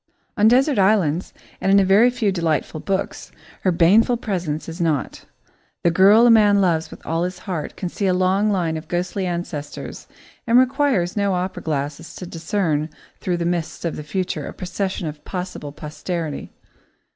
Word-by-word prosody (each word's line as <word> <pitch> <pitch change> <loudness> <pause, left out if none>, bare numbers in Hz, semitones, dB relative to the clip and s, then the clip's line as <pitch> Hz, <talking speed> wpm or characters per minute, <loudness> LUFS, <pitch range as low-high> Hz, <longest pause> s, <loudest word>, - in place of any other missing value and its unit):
On 210 -2 +4
desert 260 +1 +4
islands 190 -4 +2 0.3
and 195 - +2
in 200 - +6
a 195 - +3
very 205 +6 +5
few 240 -5 0
delightful 160 -4 -1
books, 195 +4 -3 0.3
her 185 - +2
baneful 205 +8 +4
presence 175 -9 -3
is 165 +2 -6
not. 155 -6 -1 0.6
The 170 - +4
girl 200 +7 +6
a 240 - +7
man 210 -3 +5
loves 165 -4 +1
with - - -13
all 165 +1 -1
his 180 0 -3
heart 180 -5 -5
can 185 - -4
see 195 +3 -2
a 185 - +3
long 190 +3 +2
line 170 -5 0
of 155 0 -8
ghostly 180 +3 -2
ancestors, 170 -4 -5 0.4
and 235 +1 +5
requires 255 -8 +2
no 200 -2 +1
opera 180 +1 -3
glass 150 +1 -4
to 180 - -7
discern 165 -2 -1 0.3
through 180 -2 -1
the 170 - -2
mists 170 -1 -2
of 170 - -2
the - - -6
future 180 +5 -3
a - - -7
procession 185 0 -3
of 150 -1 -8
possible 180 -5 -5
posterity. 155 +1 -5
180 Hz, 175 wpm, -21 LUFS, 165-200 Hz, 0.6 s, a